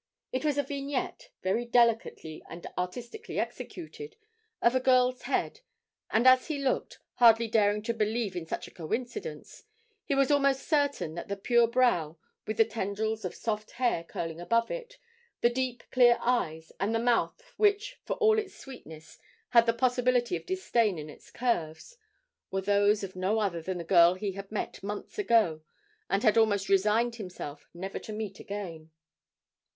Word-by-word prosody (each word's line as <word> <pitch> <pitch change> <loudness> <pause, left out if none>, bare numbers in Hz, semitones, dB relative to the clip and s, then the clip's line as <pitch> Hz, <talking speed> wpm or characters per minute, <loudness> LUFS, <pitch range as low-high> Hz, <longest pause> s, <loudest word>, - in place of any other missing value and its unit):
It 255 - -2
was 295 -2 +1
a 285 - +2
vignette, 280 - -4
very 195 +6 +1
delicately 230 -9 +1
and 170 +1 -9
artistically 240 - -5
executed, 430 +6 -6 0.4
of 235 - +3
a 260 - +3
girl's 255 -1 +3
head, - - -1 0.5
and 225 +3 +2
as 255 0 +6
he 310 -3 -2
looked, 275 -2 -1 0.2
hardly 230 -1 +6
daring 210 -1 +2
to 235 - -1
believe 220 -2 -1
in 170 -2 -5
such - - -4
a - - -14
coincidence, 245 - -5 0.4
he 280 - -1
was 275 0 +3
almost 275 -2 +2
certain 285 - +1
that 170 - -6
the 200 - -3
pure 235 +4 +3
brow, 225 -11 +2 0.3
with 215 - -3
the 225 - +6
tendrils 220 0 -3
of 185 - -4
soft 215 -1 -3
hair 240 -9 0
curling 165 0 -5
above 230 +5 +1
it, - - -6 0.4
the 235 - +4
deep 250 -1 -2
clear 245 -2 +6
eyes, 160 -10 -1
and 210 +4 0
the - - +2
mouth 245 - 0
which 420 +4 +1
for - - -2
all 440 -1 +4
its 420 -3 -6
sweetness 160 - -12 0.3
had 235 -1 +5
the - - +5
possibility 250 +3 +1
of - - -7
disdain 235 - +1
in 150 0 -7
its - - -17
curves, 200 - -2 0.5
were 195 - -2
those 205 +1 +3
of 190 -1 -6
no 190 +4 0
other 195 -6 -1
than 185 +2 -4
the 170 - -5
girl 170 0 +6
he 195 +1 -3
had 195 +1 -9
met 215 - -4
months 205 - -6
ago, 220 - +3 0.5
and 195 +3 +1
had 220 -1 +5
almost 205 -3 +2
resigned 215 +5 +2
himself 180 -8 -8
never 190 +3 -6
to - - -9
meet 210 -2 -5
again. 170 -6 -7
225 Hz, 170 wpm, -29 LUFS, 195-255 Hz, 0.5 s, as